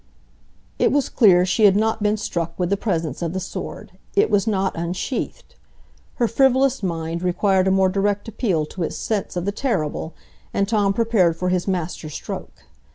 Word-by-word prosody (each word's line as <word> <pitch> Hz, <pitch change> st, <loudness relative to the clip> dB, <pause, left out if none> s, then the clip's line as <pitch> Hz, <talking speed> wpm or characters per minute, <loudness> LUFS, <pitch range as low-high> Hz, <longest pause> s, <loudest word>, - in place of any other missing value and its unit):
It -, -, +3 dB
was 285 Hz, -1 st, +1 dB
clear 185 Hz, -7 st, +5 dB
she 210 Hz, +3 st, +3 dB
had 195 Hz, -1 st, +6 dB
not 220 Hz, +1 st, +1 dB
been 210 Hz, +1 st, +2 dB
struck 170 Hz, -5 st, -3 dB
with 180 Hz, 0 st, -1 dB
the -, -, +4 dB
presence 165 Hz, -, -2 dB
of 170 Hz, -1 st, -2 dB
the 190 Hz, -, -2 dB
sword,—it 400 Hz, -, -3 dB
was 205 Hz, +1 st, +2 dB
not 195 Hz, -3 st, 0 dB
unsheathed. 175 Hz, +9 st, -4 dB, 0.6 s
Her 240 Hz, -, +1 dB
frivolous 265 Hz, +2 st, +3 dB
mind 165 Hz, -2 st, -3 dB
required 185 Hz, +1 st, +2 dB
a -, -, +3 dB
more 190 Hz, 0 st, +4 dB
direct 200 Hz, +2 st, 0 dB
appeal 195 Hz, -8 st, 0 dB
to 180 Hz, -, -8 dB
its 165 Hz, -, -2 dB
sense 210 Hz, -5 st, -2 dB
of 175 Hz, -, -2 dB
the 200 Hz, -, 0 dB
terrible, 170 Hz, -, -2 dB, 0.4 s
and 200 Hz, -, +1 dB
Tom 205 Hz, -2 st, +2 dB
prepared 205 Hz, -7 st, +2 dB
for 180 Hz, +1 st, -1 dB
his 180 Hz, 0 st, 0 dB
master 175 Hz, -4 st, -3 dB
stroke. 150 Hz, -, -7 dB
195 Hz, 175 wpm, -22 LUFS, 175-215 Hz, 0.6 s, had